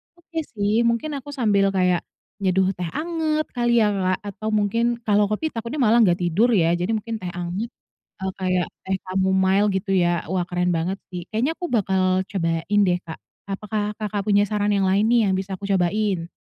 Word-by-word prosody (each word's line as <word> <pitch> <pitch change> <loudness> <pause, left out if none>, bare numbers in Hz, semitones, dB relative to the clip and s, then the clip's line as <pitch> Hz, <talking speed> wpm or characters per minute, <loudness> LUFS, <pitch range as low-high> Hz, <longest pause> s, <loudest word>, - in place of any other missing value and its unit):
Oke 335 -1 -6 0.2
sih, 205 +2 +1
mungkin 235 +7 0
aku 290 - -12
sambil 205 -6 +2
kayak 180 -2 +2 0.4
nyeduh 190 -1 +2
teh 175 -1 -3
anget 315 -2 0
kali 240 -1 0
ya, - - +3
Kak. 185 0 +1
Atau 215 +3 -7
mungkin 230 +3 +1
kalau 210 -1 +3
kopi 215 +10 -2
takutnya 230 +4 -5
malah 230 +2 +5
enggak 185 -6 +5
tidur 180 +8 +3
ya. 165 -2 +3
Jadi 180 +6 -1
mungkin 225 +1 -3
teh 175 - -3
anget, 180 +7 -3 0.5
eee, 190 - -1
kayak 185 -2 +1 0.2
teh 190 - +1
chamomile 190 +2 +2
gitu 195 +1 -2
ya. 175 - +2 0.2
Wah 180 -2 0
keren 180 0 0
banget 180 +4 -2
sih. 180 -1 -4
Kayaknya 235 +7 0
aku 355 - -4
bakal 190 -3 +1 0.3
cobain 170 +2 0
deh, 175 0 +2
Kak. 160 - -8 0.3
Apakah 210 +1 -2
Kakak 205 -1 -2
punya 205 0 +3
saran 210 0 0
yang 195 -2 +2
lain 195 +2 +3
nih 240 - +5
yang 190 - +2
bisa 190 +1 -4
aku 200 - -5
cobain? 190 -2 0
200 Hz, 190 wpm, -23 LUFS, 185-220 Hz, 0.5 s, malah